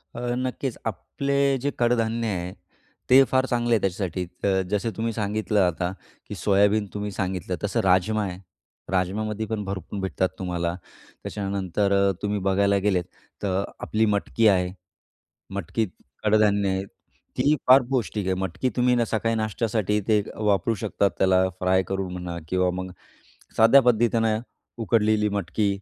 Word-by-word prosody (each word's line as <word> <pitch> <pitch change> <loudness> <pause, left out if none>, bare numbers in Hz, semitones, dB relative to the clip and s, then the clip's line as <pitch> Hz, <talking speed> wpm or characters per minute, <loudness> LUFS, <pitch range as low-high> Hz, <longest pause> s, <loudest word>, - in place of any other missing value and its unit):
अ, - - -5 0.2
नक्कीच 130 0 -3
आपले 140 0 -3 0.3
जे 145 - +2
कडधान्य 115 -1 +1
आहे 90 +1 -4 0.6
ते 135 +2 +8
फार 130 0 +3
चांगले 120 -2 0
आहे - - +2
त्याच्यासाठी 95 -1 -2 0.2
अ, 95 -1 +2
जसे 105 +2 0
तुम्ही 115 0 -1
सांगितलं 105 0 -1
आता, 90 +1 -2 0.4
की - - -5
सोयाबीन 105 +1 +2
तुम्ही 105 0 -4
सांगितलं, 95 -1 -3
तसं 105 +3 0
राजमा 95 +3 +2
आहे, 90 -2 -4 0.5
राजमामध्ये 105 +4 -1
पण 105 -1 -3
भरपूर 95 0 -5
भेटतात 95 -1 -1
तुम्हाला. 85 -2 -2 0.5
त्याच्यानंतर 100 0 -1 0.3
तुम्ही 105 0 -1
बघायला 100 +1 +2
गेलेत 90 -3 +2 0.4
तर 95 0 0 0.2
आपली 110 +1 +1
मटकी 110 +2 +1
आहे. 90 -2 +3 0.8
मटकीत 100 +4 -1 0.4
कडधान्य 105 -2 +3
आहे. 95 0 -1 0.5
ती - - +1
ही 155 - +5
फार 130 +1 +8
पौष्टिक 110 -6 -1
आहे. 95 - +1
मटकी 95 +6 -2
तुम्ही 125 0 +3
आहे - - +2
ना 120 - +2
सकाळी 115 +1 -1
नाश्त्यासाठी 110 -1 0
ते 105 -2 +4
वापरू 105 +1 +1
शकता. 100 +1 0
त्याला 95 0 +3
फ्राय 95 +1 +2
करून 95 -1 -3
म्हणा 90 -1 -5
किंवा 90 0 +2
मग 95 0 -5 0.7
साध्या 115 +5 +7
पद्धतीनं 115 -2 +2 0.4
उकडलेली 105 0 +2
मटकी, 100 +2 -1
105 Hz, 145 wpm, -25 LUFS, 95-110 Hz, 0.8 s, ते